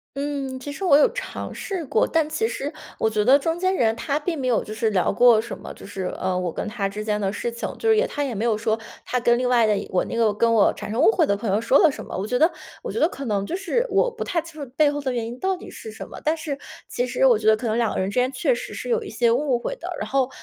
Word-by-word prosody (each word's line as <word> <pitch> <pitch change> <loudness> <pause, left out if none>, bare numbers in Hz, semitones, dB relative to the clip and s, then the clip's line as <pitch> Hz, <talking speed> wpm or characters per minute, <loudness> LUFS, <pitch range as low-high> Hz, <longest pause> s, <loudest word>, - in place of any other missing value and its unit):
嗯， 275 -2 -3
其 285 +2 -6
实 385 - -7
我 280 - +6
有 295 - +5
尝 - - -5
试 375 -5 -4
过。 220 - +2
但 320 -2 +1
其 445 +8 0
实 290 - -4 0.3
我 220 - +2
觉 215 -1 0
得 270 +4 +6
中 325 +3 -1
间 375 +1 +1
人 225 -7 +2
她 285 +5 -1
并 325 0 -3
没 260 - -3
有 245 -2 +2
就 215 - -9
是 220 0 0
聊 185 -3 +2
过 235 0 +5
什 230 0 -7
么， - - -9
就 - - -12
是， 190 -2 -4
嗯， 185 -1 0
我 175 -2 -2
跟 - - -4
她 210 -2 -2
之 210 +2 -5
间 210 -1 -1
的 195 0 -1
事 235 - -3
情， 235 - -4
就 450 - +1
是 440 - +5
也 460 - +3
她 290 - -3
也 250 -5 -3
没 220 +4 -1
有 225 - +2
说， 220 0 0 0.3
她 250 - 0
跟 240 0 +3
另 250 0 0
外 240 -2 +4
的 215 -1 +3
也 - - -4
我 180 - +1
那 - - -5
个 225 -2 +3
跟 230 +2 +2
我 215 -3 +5
产 - - -7
生 230 +5 0
误 385 - +6
会 345 -7 +3
的 200 - +1
朋 205 +1 -4
友 200 +3 +2
说 230 +4 +4
了 320 - +6
什 - - -8
么。 - - -7
我 195 +3 -3
觉 250 +2 0
得 320 +5 +4 0.3
我 - - -4
觉 - - -3
得 325 - +4
可 275 - -7
能 205 -4 0
就 265 - -3
是 395 +6 -1
我 - - +2
不 - - -5
太 350 - -1
清 315 -3 -9
楚 245 - -10
背 300 -2 +5
后 290 0 -3
的 265 -2 -1
原 235 -2 -2
因 240 +2 -7
到 380 -1 0
底 - - -11
是 440 - -9
什 - - -9
么？ - - -10
但 315 +2 +1
是 290 -3 -4 0.3
其 245 +1 -2
实 250 +2 +1
我 240 -5 +5
觉 215 - -2
得 215 0 +6
可 250 - -6
能 220 -1 0
两 235 -2 +1
个 - - -2
人 190 - 0
之 250 - +1
间 255 +2 +1
确 265 - +1
实 - - -6
是 - - -6
有 470 0 +2
一 405 - -8
些 235 -1 +2
误 260 0 +1
会 370 - -4
的。 - - -7
然 - - -3
后， 270 -2 +1
250 Hz, 345 characters per minute, -23 LUFS, 220-305 Hz, 0.3 s, 我